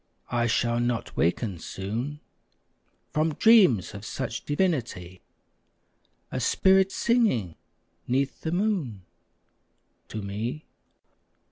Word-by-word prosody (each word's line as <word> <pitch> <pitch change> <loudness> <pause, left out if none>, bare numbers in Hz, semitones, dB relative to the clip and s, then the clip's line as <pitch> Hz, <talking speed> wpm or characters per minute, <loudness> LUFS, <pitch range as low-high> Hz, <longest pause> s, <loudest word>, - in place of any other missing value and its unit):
I 120 -1 +1
shall 120 +1 +1
not 120 -1 -2
waken 90 +2 0
soon 115 - -5 0.9
From 155 0 0
dreams 195 - +5
of 100 0 -8
such 130 +3 -4
divinity! 125 - -1 1.1
A - - -2
spirit 190 0 +3
singing 215 - +1 0.5
'neath 135 +2 -1
the 160 - -3
moon 175 - -1 1.0
To 110 -1 -6
me. 110 +9 -4
125 Hz, 95 wpm, -26 LUFS, 105-165 Hz, 1.1 s, dreams